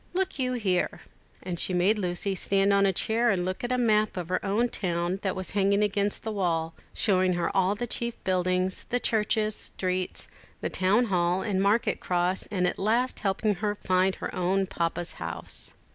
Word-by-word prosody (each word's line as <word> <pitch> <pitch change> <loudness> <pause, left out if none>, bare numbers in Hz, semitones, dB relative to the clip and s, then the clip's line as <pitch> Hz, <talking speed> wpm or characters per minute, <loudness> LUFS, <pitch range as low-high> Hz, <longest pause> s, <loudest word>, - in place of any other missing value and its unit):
Look 375 -5 -1
you 255 -1 0
here:" 190 -7 0 0.4
and 175 -2 -4
she 185 - +3
made 195 +5 +3
Lucy 180 +1 -1
stand 195 +1 +2
on 200 0 +4
a - - +3
chair 225 +6 +1
and 185 -4 +1
look 185 +4 -3
at 245 - -2
a 250 - +2
map 215 -4 +2
of 175 -2 -4
her 185 - -1
own 210 +5 +1
town 175 -3 -2
that 190 - -1
was 185 0 -4
hanging 200 +1 +2
against 205 0 0
the 220 - -3
wall, 165 -5 -1 0.2
showing 185 -3 +2
her 175 +2 -1
all 190 +1 +3
the 240 - -3
chief 235 0 -2
buildings, 185 0 0
the 245 - +1
churches, 215 -1 +1
streets, 185 -1 -3 0.3
the - - -3
town 200 +6 +3
hall, 175 +1 +2
and 195 -3 0
market 205 +4 +2
cross, 180 +1 0
and 185 -3 0
at 180 - -1
last 235 +6 +1
helping 205 +1 +1
her 210 -1 0
to - - -30
find 185 +1 +2
her - - -5
own 190 +1 +1
Papa's 170 -1 -2
house. 85 0 -3
195 Hz, 195 wpm, -27 LUFS, 180-215 Hz, 0.4 s, on